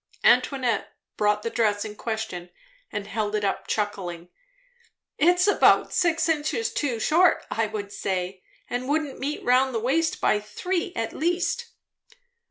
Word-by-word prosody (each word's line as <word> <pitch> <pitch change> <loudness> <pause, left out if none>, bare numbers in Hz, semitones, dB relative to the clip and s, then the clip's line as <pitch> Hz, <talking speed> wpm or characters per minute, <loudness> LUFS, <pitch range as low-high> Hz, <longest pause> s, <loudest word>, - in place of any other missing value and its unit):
Antoinette 250 -7 +2 0.2
brought 210 0 +1
the 230 - -2
dress 210 -3 +1
in 210 -1 -7
question 220 -6 -4 0.4
and 205 - -4
held 215 0 -2
it 210 - -1
up, 195 - -2
chuckling. 185 -5 -3 0.9
"It's 355 +2 +4
about 410 - +4
six 340 -2 +2
inches 325 +8 0
too 255 -6 -1
short, 340 +9 +3
I 220 -1 0
should 205 -2 -5
say, 185 0 -3 0.3
and 250 +2 -3
wouldn't 300 -2 -1
meet 285 +3 -3
round 255 +1 +3
the - - +1
waist 315 +8 +1
by 210 - +2
three 355 - -3
at 225 -1 -2
least." 355 - -1
230 Hz, 145 wpm, -25 LUFS, 210-315 Hz, 0.9 s, It's